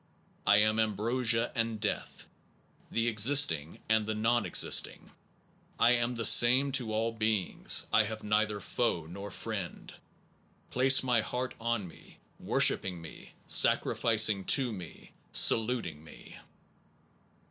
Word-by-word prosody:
I 105 Hz, -, +4 dB
am 110 Hz, +1 st, +1 dB
ambrosia 115 Hz, +2 st, -1 dB
and 115 Hz, -1 st, -3 dB
death, 105 Hz, -1 st, -6 dB, 0.6 s
the 115 Hz, 0 st, -2 dB
existing 110 Hz, -, +2 dB
and 110 Hz, 0 st, +1 dB
the 110 Hz, -, -3 dB
non 115 Hz, +3 st, -1 dB
existing.... -, -, 0 dB, 0.7 s
I 115 Hz, -, +3 dB
am 120 Hz, 0 st, -1 dB
the 115 Hz, -1 st, -4 dB
same 130 Hz, +6 st, +5 dB
to 125 Hz, -5 st, -3 dB
all 110 Hz, +1 st, -2 dB
beings. 110 Hz, -4 st, 0 dB
I 110 Hz, -, +3 dB
have 110 Hz, +1 st, -8 dB
neither 105 Hz, 0 st, -1 dB
foe 95 Hz, -6 st, -3 dB
nor 100 Hz, +5 st, -10 dB
friend.... 100 Hz, -3 st, -8 dB, 0.8 s
Place 130 Hz, +1 st, +4 dB
thy 125 Hz, -3 st, 0 dB
heart 125 Hz, +3 st, -6 dB
on 115 Hz, -4 st, -3 dB
me, 85 Hz, -, -18 dB, 0.2 s
wor -, -, -3 dB
shipping 90 Hz, -2 st, +2 dB
me, 80 Hz, -1 st, -14 dB
sacrificing 110 Hz, -3 st, +2 dB
to 130 Hz, -5 st, +1 dB
me, 90 Hz, -5 st, -12 dB, 0.2 s
saluting 110 Hz, -10 st, +2 dB
me. 80 Hz, -, -15 dB
110 Hz, 125 wpm, -28 LUFS, 105-120 Hz, 0.8 s, same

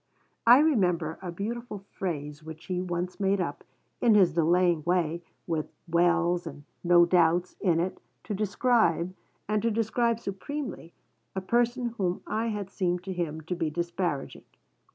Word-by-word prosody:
I 240 Hz, +2 st, +10 dB
remember 180 Hz, -, +2 dB
a 180 Hz, -2 st, -5 dB
beautiful 210 Hz, +2 st, -5 dB
phrase 150 Hz, -4 st, -4 dB
which 160 Hz, 0 st, -10 dB
he 180 Hz, -1 st, -2 dB
once 180 Hz, +1 st, -3 dB
made 195 Hz, 0 st, +2 dB
up, 170 Hz, -5 st, -3 dB, 0.4 s
in 230 Hz, -3 st, +5 dB
his 185 Hz, -5 st, +5 dB
delaying 170 Hz, 0 st, +3 dB
way, 170 Hz, -1 st, 0 dB, 0.2 s
with 160 Hz, -2 st, -2 dB, 0.2 s
'wells' 175 Hz, +1 st, +2 dB
and 145 Hz, -2 st, -9 dB, 0.2 s
'no 175 Hz, 0 st, +6 dB
doubts' 175 Hz, 0 st, +2 dB
in 170 Hz, -4 st, +2 dB
it, 180 Hz, +2 st, -2 dB, 0.2 s
to -, -, -4 dB
describe, 205 Hz, -4 st, +1 dB, 0.3 s
and 210 Hz, 0 st, +1 dB
to 230 Hz, -, +1 dB
describe 230 Hz, +1 st, +1 dB
supremely, 230 Hz, -, -6 dB, 0.4 s
a 190 Hz, -, -1 dB
person 240 Hz, +4 st, +1 dB
whom 180 Hz, -2 st, -1 dB
I 225 Hz, +2 st, -1 dB
had 205 Hz, -3 st, -4 dB
seemed 180 Hz, -2 st, -1 dB
to 190 Hz, 0 st, -4 dB
him 160 Hz, -3 st, -3 dB
to 165 Hz, +4 st, -4 dB
be 165 Hz, -3 st, -1 dB
disparaging. 170 Hz, -2 st, -3 dB
180 Hz, 155 wpm, -28 LUFS, 170-210 Hz, 0.4 s, I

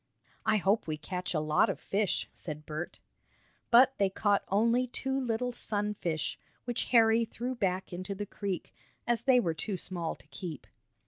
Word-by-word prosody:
"I 215 Hz, 0 st, +5 dB
hope 200 Hz, +1 st, +2 dB
we 155 Hz, -1 st, -2 dB
catch 180 Hz, +4 st, -4 dB
a -, -, +3 dB
lot 155 Hz, 0 st, +3 dB
of -, -, -2 dB
fish," 200 Hz, -1 st, 0 dB
said 150 Hz, -2 st, -6 dB
Bert. 155 Hz, +3 st, -5 dB, 0.7 s
But 255 Hz, +3 st, +7 dB
they 200 Hz, -1 st, +4 dB
caught 205 Hz, +1 st, +2 dB
only 230 Hz, +5 st, +3 dB
two 265 Hz, +2 st, -1 dB
little 245 Hz, 0 st, -1 dB
sun 210 Hz, -3 st, -1 dB
fish, 160 Hz, -6 st, -2 dB, 0.3 s
which 240 Hz, -1 st, -1 dB
Harry 230 Hz, -1 st, +5 dB
threw 240 Hz, +3 st, -4 dB
back 190 Hz, -6 st, -1 dB
into 185 Hz, +3 st, -4 dB
the 205 Hz, +1 st, -4 dB
creek, 195 Hz, -3 st, -4 dB, 0.3 s
as 240 Hz, -1 st, +1 dB
they 260 Hz, -2 st, +6 dB
were 170 Hz, -8 st, +1 dB
too 190 Hz, +5 st, -3 dB
small 175 Hz, -3 st, -3 dB
to -, -, -21 dB
keep. 170 Hz, -7 st, -7 dB
205 Hz, 175 wpm, -31 LUFS, 175-235 Hz, 0.7 s, But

